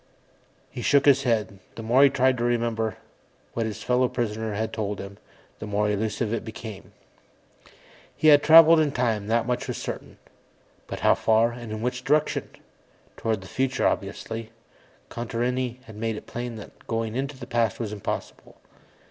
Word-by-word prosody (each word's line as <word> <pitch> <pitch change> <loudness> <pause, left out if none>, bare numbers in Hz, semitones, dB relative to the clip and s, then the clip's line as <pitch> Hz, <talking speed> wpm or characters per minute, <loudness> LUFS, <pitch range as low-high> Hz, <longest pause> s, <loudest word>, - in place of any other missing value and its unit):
He 120 - -6
shook 140 +2 +3
his 140 -2 +5
head. 105 -4 -1 0.2
The 115 - -7
more 120 +4 +4
he 140 - +7
tried 130 -2 +2
to - - -1
remember 115 -2 0 0.6
what 115 -1 -1
his 110 0 -6
fellow 125 +2 +2
prisoner 110 -3 -2
had 110 +1 -2
told 105 -2 -3
him, 100 0 -9 0.4
the 105 - -6
more 105 0 +1
elusive 105 +1 -1
it 115 - -2
became. 110 -2 -9 1.2
He 155 - +5
had 145 -1 +8
traveled 165 +1 +8
in 150 -3 +1
time, 115 -6 0
that 115 +1 +1
much 125 0 -2
was - - -3
certain, - - -6 0.7
but - - -6
how - - +5
far, 115 +1 +3
and 120 -2 -8
in 110 +1 -4
which 125 +1 -2
direction? 150 +2 +1 0.7
Toward 110 -3 -2
the 95 - -11
future, 130 +4 -1
obviously; 115 0 -2 0.6
Contarini 120 +1 -2
had 110 -2 -12
made 115 0 -2
it - - -8
plain 120 -1 -5
that 105 - -12
going 115 -1 -2
into 135 +1 -3
the 125 - -8
past 115 -3 0
was 110 -3 -3
impossible. 100 - -6
115 Hz, 170 wpm, -25 LUFS, 110-125 Hz, 1.2 s, had